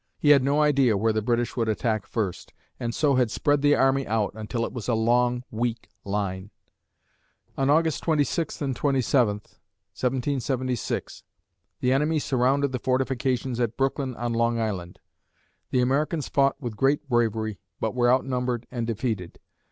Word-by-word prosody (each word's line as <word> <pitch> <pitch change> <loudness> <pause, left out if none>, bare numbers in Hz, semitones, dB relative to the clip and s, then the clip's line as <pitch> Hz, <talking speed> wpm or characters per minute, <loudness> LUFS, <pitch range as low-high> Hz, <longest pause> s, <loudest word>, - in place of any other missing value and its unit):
He 150 - +4
had 140 -2 +7
no 140 +3 +1
idea 135 -7 +3
where 110 +2 +1
the 110 - 0
British 120 +1 0
would 115 -2 0
attack 110 -1 -1
first, 100 -6 -3 0.3
and 115 -1 -3
so 145 -4 +2
had 125 -3 +3
spread 145 +5 +1
the 145 0 +4
army 135 0 +2
out 110 -1 0
until 110 +2 -3
it - - -7
was 120 -4 -6
a 120 - +2
long, 120 +2 +2
weak 115 +1 -3
line. 100 -1 -3 1.1
On 135 0 0
August 160 +1 +2
26 155 0 0
and 135 -2 -1
27 130 -5 +2
(1776), 130 +3 -3 0.6
the 125 +1 +2
enemy 150 +4 +2
surrounded 135 0 +1
the 130 - -2
fortifications 130 -1 -1
at 120 -2 -1
Brooklyn 135 -1 -1
on 120 0 -2
Long 115 0 +1
Island. 95 -6 -3 0.7
The 125 - +2
Americans 145 +4 0
fought 140 -1 +2
with 120 -6 -5
great 140 +4 +1
bravery, 110 -4 0 0.2
but 110 - -1
were 120 -1 +3
outnumbered 125 -2 0
and 120 -3 -3
defeated. 110 -6 -3
125 Hz, 155 wpm, -25 LUFS, 115-135 Hz, 1.1 s, had